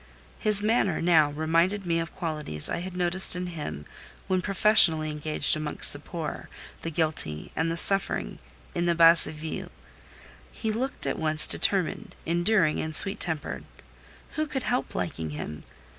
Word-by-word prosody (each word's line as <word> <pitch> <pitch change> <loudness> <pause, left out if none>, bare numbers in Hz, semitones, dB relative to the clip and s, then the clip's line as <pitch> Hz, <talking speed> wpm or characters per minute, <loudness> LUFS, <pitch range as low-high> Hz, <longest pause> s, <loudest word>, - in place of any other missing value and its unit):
His 210 -1 +2
manner, 215 -5 +1
now, 165 -3 +3
reminded 165 +6 0
me 165 -1 0
of 165 0 -6
qualities 150 - -4
I - - -3
had 180 +1 -7
noticed 180 +1 +3
in 180 0 -4
him 150 - -7 0.4
when 185 -1 0
professionally 185 -6 +3
engaged 150 0 +2
amongst 155 -1 +2
the - - -7
poor, - - -7 0.3
the 165 - -5
guilty, 155 - -3
and 165 0 -1
the 165 - -4
suffering, 195 +3 +3 0.3
in 175 0 -2
the 170 - +1
Basse 165 0 +6
Ville: 155 +1 -7 0.8
he 220 - -4
looked 255 +5 -4
at - - -3
once 155 -1 +3
determined, 190 -5 0
enduring, 175 -1 +1
and 155 0 -2
sweet 195 +4 +4
tempered. 160 -4 -2 0.7
Who 310 0 -3
could 265 -3 -4
help 245 - -3
liking 80 -3 -4
him? 75 -1 -7
165 Hz, 155 wpm, -26 LUFS, 155-190 Hz, 0.8 s, Basse